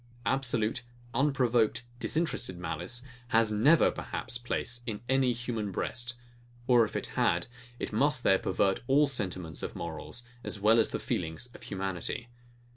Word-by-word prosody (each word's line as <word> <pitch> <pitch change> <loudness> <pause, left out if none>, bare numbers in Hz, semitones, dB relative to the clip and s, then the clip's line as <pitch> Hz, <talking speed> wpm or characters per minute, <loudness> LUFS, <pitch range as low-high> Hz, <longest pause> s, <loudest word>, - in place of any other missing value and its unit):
Absolute, 120 -4 +1 0.3
unprovoked, 120 -4 +2 0.2
disinterested 130 - 0
malice 90 +7 -2 0.2
has 115 -2 +3
never 140 +10 +5
perhaps 125 - -5
place 120 0 -2
in 105 -3 -3
any 130 -1 +3
human 115 -4 -3
breast; 120 +5 -2 0.5
or 120 -2 +6
if 110 - -4
it - - -1
had, 85 +1 +2 0.5
must 130 +3 +2
there 95 -1 +5
pervert 95 +1 +1
all 145 +3 +5
the 140 - +1
sentiments 90 - -2
of - - -5
morals, 120 - -5 0.2
as 105 - -2
well 110 +3 +5
as 110 - +4
the - - -2
feelings 85 +8 -3
of - - -13
humanity. 95 +4 -4
115 Hz, 145 wpm, -30 LUFS, 100-125 Hz, 0.5 s, or